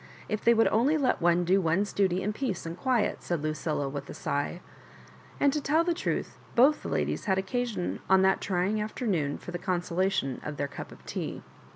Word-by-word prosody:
If 215 -1 -2
they 235 0 +5
would 225 - +5
only 260 +8 +3
let 265 -9 +1
one 175 +1 +3
do 190 +3 +4
one's 185 +4 +1
duty 190 -2 +1
in 210 +2 -1
peace 215 -8 -3
and 165 0 -4
quiet," 240 +3 0
said 170 -4 -2
Lucilla, 155 -1 -1
with 140 0 -6
a - - -7
sigh; 145 +5 -2 0.8
and 280 -1 +4
to 300 - -1
tell 310 +4 +3
the 345 0 +1
truth, - - -3 0.2
both 275 +5 +5
the - - -5
ladies - - -1
had 190 -3 +2
occasion 210 0 -2
on 190 0 +6
that 190 0 +3
trying 195 +3 0
afternoon 195 - -1
for - - -9
the 175 - -4
con 180 -1 0
solation 180 -7 -1
of 150 -1 -5
their 145 - -1
cup 140 - -8
of - - -15
tea. - - -4
190 Hz, 210 wpm, -28 LUFS, 170-230 Hz, 0.8 s, on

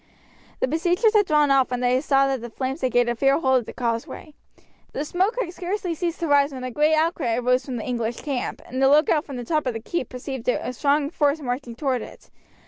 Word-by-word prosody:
The - - +2
besiegers 350 - +2
had 415 -3 +4
drawn 300 -2 +3
off 270 -1 +4
when 250 -1 -2
they 250 +1 +2
saw 275 -2 +3
that 270 -3 -1
the 240 - -7
flames 265 +5 -4
had 255 - 0
gained 245 0 +3
a 240 - +1
fair 275 +3 +3
hold 265 -4 +3
of 240 - -8
the - - -7
causeway. 235 +5 -4 0.6
The 295 - -3
smoke 375 +8 0
had 360 -8 -2
scarcely 365 0 -3
ceased 340 +1 -3
to 335 - 0
rise 285 0 +4
when 260 -2 -7
a 255 - -4
great 300 +4 +3
outcry 310 -7 0
arose 250 +2 +1
from 260 - -5
the 220 - -5
English 235 -2 -3
camp, 275 -5 -3
and 260 +2 -4
the 270 - +5
lookout 300 +1 +3
from 275 - -8
the 245 - -5
top 305 0 0
of 250 - 0
the - - -3
keep 255 +3 -4
perceived 255 -1 -5
a 250 - -1
strong 285 +3 +1
force 295 -2 +1
marching 245 -3 -4
toward 260 -2 -1
it. - - -12
275 Hz, 240 wpm, -23 LUFS, 250-310 Hz, 0.6 s, the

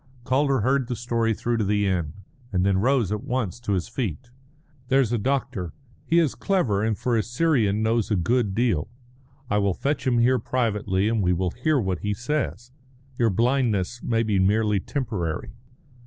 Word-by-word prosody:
Calder 135 0 +2
heard 130 +2 +1
the 125 - -2
story 115 -1 0
through 115 +2 -1
to 110 - +1
the 105 0 +1
end, 85 -6 -1 0.4
and 90 -2 +1
then 95 -1 +2
rose 120 -3 +2
at 105 - -2
once 125 -6 -2
to 110 -4 -2
his 90 -3 -1
feet. 115 - -4 0.6
"There's 130 -3 +2
a 120 - +1
doctor. 130 - -2 0.3
He 165 - +3
is 160 -6 +3
clever, 120 - 0
and, 110 -2 0
for 125 -2 0
a 110 - +3
Syrian, 115 -5 +1
knows 115 -1 +1
a 105 - +2
good 100 +3 +1
deal. 110 -9 +1 0.6
I 105 -1 +1
will 100 -3 +1
fetch 145 -1 -2
him 125 -2 +3
here 125 +2 +3
privately, 105 -5 0
and 110 -1 +1
we 90 -1 +2
will 90 0 -1
hear 145 - +1
what 95 -6 -1
he 105 0 -2
says. 125 -1 -3 0.5
Your 115 -2 +4
blindness 120 -1 0
may 115 -1 +1
be 105 -3 +1
merely 105 +1 +2
temporary." 95 - -3
115 Hz, 185 wpm, -24 LUFS, 100-125 Hz, 0.6 s, Your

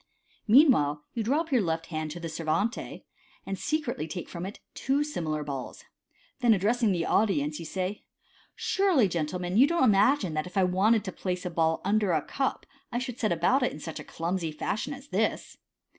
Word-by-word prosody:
Meanwhile, 205 - +5
you 230 - -2
drop 295 +8 0
your 255 -4 +4
left 165 -3 -1
hand 155 -2 -4
to 165 +3 -7
the 170 - -5
ser 160 0 -6
vante, 200 +10 -1 0.4
and 195 - -3
Sv 305 +10 -1
cretly 160 - -4
take 175 0 -5
from 175 +2 -5
it 200 - -9
two 275 +3 0
similar 155 - -3
balls. 140 -3 -6 0.6
Then, 240 -3 +5
addressing 220 +3 +2
the 170 -3 0
audience, 150 -8 +1
you 165 - -7
say, 185 +3 -2
u 205 - -12 0.6
Surely, 390 - +2
gentlemen, 175 +2 -2
you 265 +5 +7
don't 340 -2 +1
imagine 205 - +4
that, 155 +2 -2
if 180 - -8
I 190 - +5
wanted 195 +4 +3
to 190 - -4
place 180 0 -4
a 180 - -3
ball 160 -1 +1
under 205 -2 +2
a 155 -2 +1
cup, 270 -1 -2 0.3
I 240 - -1
should 250 -1 -4
set 215 - +1
about 175 - +2
it 250 - +3
after - - -6
such 160 +1 -6
a - - -7
clumsy 170 0 -3
fashion 215 - -3
as 275 +2 -14
this - - -1
190 Hz, 205 wpm, -28 LUFS, 165-245 Hz, 0.6 s, you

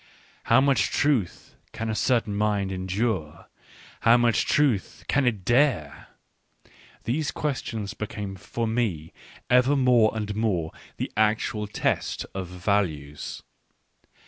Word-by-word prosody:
How 115 - +5
much 140 0 +2
truth 135 - 0 0.2
can 115 - -4
a 110 - -1
certain 115 -2 +1
mind 100 -2 0
en 95 0 -4
dure; 95 -6 -2 0.5
how 115 +1 +5
much 120 -2 +2
truth 140 -10 +1
can 140 -2 +2
it 105 -6 -1
dare? 120 - +1 0.5
— - - -27
these 145 +6 -1
ques 145 -4 -2
tions 105 -3 -5
became 105 -2 -5
for 115 +4 -4
me 110 -9 -2 0.3
ever 125 +3 +4
more 125 -5 +4
and 105 -1 -3
more 95 -8 0 0.3
the - - -3
actual 110 0 +1
test - - -1
of 95 -1 -4
values. 85 -6 -2
110 Hz, 130 wpm, -25 LUFS, 95-120 Hz, 0.5 s, How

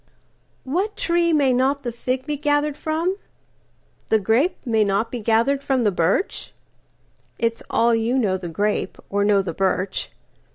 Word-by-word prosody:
WHAT 370 +10 -2
tree 340 0 +2
may 280 -5 +3
not 270 +3 +1
the 240 - -2
fig 255 +2 -3
be 300 0 -2
gathered 290 0 0
from? 325 +5 -1 0.9
The 220 - +5
grape 225 - +1
may 225 -3 +2
not 205 +3 0
be 245 - -4
gathered 230 +6 +1
from 265 -3 +1
the 210 - +3
birch? 180 - -1 0.8
It's 230 0 -1
all 235 +1 +3
you 230 +3 +1
know 205 -7 +1
the 180 -2 -5
grape, 205 +6 -1
or 200 0 +1
know 200 -1 +3
the 175 -3 -4
birch. 190 +1 -1
235 Hz, 160 wpm, -22 LUFS, 205-285 Hz, 0.9 s, The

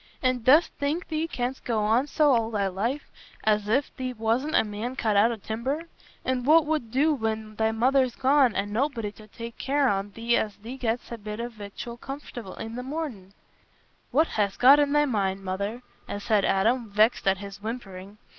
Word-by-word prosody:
"An' 255 -1 +2
dost 285 +8 +5
think 300 +5 -1
thee 315 0 -1
canst 255 -3 -3
go 220 -3 0
on 230 +6 +2
so 295 0 +3
all 230 -2 +1
thy 205 -3 0
life, 220 +10 -2 0.3
as 210 -1 +2
if 265 +5 +1
thee 255 -1 -3
wast 230 +4 0
a - - +4
man 220 +4 -5
cut 220 -5 0
out 215 +4 +5
o' - - -2
timber? 235 +9 -3 0.4
An' 255 -1 0
what 310 +4 +5
wut 305 -7 -1
do 285 +6 +3
when 220 -4 -3
thy 220 0 +2
mother's 255 +2 +2
gone, 265 -3 +3
an' 205 +1 -2
nobody 235 -3 -1
to 215 +1 -15
take 230 +2 -9
care 280 0 +2
on 200 -2 0
thee 230 +2 +1
as 210 -2 -2
thee 230 +5 -8
gett'st 240 0 -2
a 235 - -5
bit 210 +1 -6
o' 235 +1 -3
victual 220 +2 -8
comfortable 245 -7 -8
i' - - -5
the 235 +2 -5
mornin'?" 255 - -5 0.8
"What 315 +4 +4
hast 205 -9 -1
got 275 +4 +7
i' 290 - +5
thy 295 +1 +2
mind, 195 -6 -1
Mother?" 200 +6 -3 0.3
said 205 -1 +1
Adam, 225 +4 +1
vexed 215 +1 +2
at 190 0 +3
this 200 0 -8
whimpering. 205 -3 -7
230 Hz, 195 wpm, -26 LUFS, 210-265 Hz, 0.8 s, got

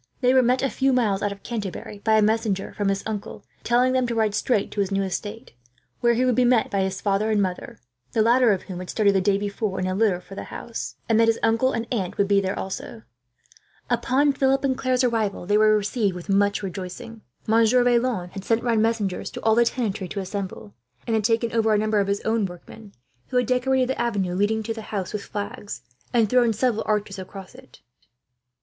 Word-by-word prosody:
They 250 0 +4
were 260 - +6
met, 250 +2 +2
a 270 - +2
few 270 0 +1
miles 210 -6 +1
out 205 - 0
of 200 0 -10
Canterbury, 210 -2 -5
by 220 +1 +1
a 215 - +4
messenger 215 -2 0
from 205 -1 -1
his 195 0 -1
uncle; 215 -2 -6 0.2
telling 250 +2 +3
them 255 -1 +1
to 235 - -2
ride 220 -2 +1
straight 210 -1 0
to - - -5
his 195 - -1
new 195 0 +1
estate, 205 +5 -5 0.5
where 235 -1 +3
he 250 +2 +2
would 250 - +3
be 255 - +3
met 245 -2 +3
by 200 - 0
his 190 +1 -3
mother 200 +2 +1
and 215 -1 +2
father 185 -1 -5 0.4
the 220 - +3
latter 240 +1 +4
of 195 - -1
whom 185 -3 -7
had 185 - -8
started, 205 -2 +2
the 190 - +2
day 195 +1 +2
before, 200 0 -3
in 185 - -1
a 185 - -1
litter 195 -3 +2
for 195 - -13
the - - -6
house 230 - -6
and 225 -1 +3
that 230 - +5
his 225 0 +3
uncle 230 +3 +3
and 230 -2 -2
aunt 190 -6 -2
would 200 0 +1 0.3
also 190 - -4
be 230 - -10
there. - - -25 0.8
Upon 270 +4 +2
Philip 270 0 +1
and 265 -2 +1
Claire's 255 -1 0
arrival, 220 -6 0
they 205 +3 +1
were 215 0 +5
received 205 -2 -1
with 180 +2 -9
much 200 +1 +2
rejoicing. 190 +4 -7 0.2
Monsieur 230 +3 +4
Vaillant 235 -7 +1
had 195 - -7
sent 225 +3 +1
round 230 -3 +2
messengers 220 -4 -1
to - - -8
all 220 - +4
the 235 +1 +4
tenantry 215 -6 -2
to 200 - -5
assemble, 190 - -6 0.3
and 230 - -2
had 220 - +1
taken 230 0 +1
over 225 -2 +3
a - - +3
number 215 0 +1
of 200 - +1
his 200 0 -1
workmen, 210 -1 -3 0.4
who 250 - -1
had 250 - +3
decorated 255 +1 +1
the 265 - -1
avenue 200 -6 -1
leading 210 +4 0
to 225 +1 -3
the 225 - -7
house 200 -3 -5
with 210 - -3
flags, 205 - -6 0.3
and 230 -3 +3
thrown 240 0 +3
several 225 0 0
arches 210 -2 -1
across 190 0 -9
it. - - -17
215 Hz, 225 wpm, -24 LUFS, 200-235 Hz, 0.8 s, were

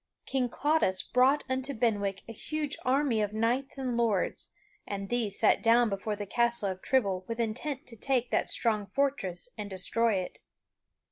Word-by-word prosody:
King 255 -2 0
Claudas 290 -9 +1
brought 260 +4 +3
unto 260 +1 -2
Benwick 205 -4 0
a - - -7
huge 300 +5 -3
army 260 -3 +2
of 210 0 -1
knights 240 +6 0
and 255 -3 -2
lords, 225 -5 0 0.4
and 195 -1 -4
these 230 -5 -1
sat 220 - +4
down 235 0 +5
before 200 +2 -2
the 205 0 -5
Castle 235 -1 +1
of 185 0 -8
Trible 200 -8 +1
with 230 0 -4
intent 250 +5 -3
to 240 - -9
take 245 +1 0
that - - +1
strong 215 -4 +1
fortress 200 -6 -1
and 205 -1 -4
destroy 215 +4 +1
it. 185 -1 -4
230 Hz, 165 wpm, -29 LUFS, 205-260 Hz, 0.4 s, down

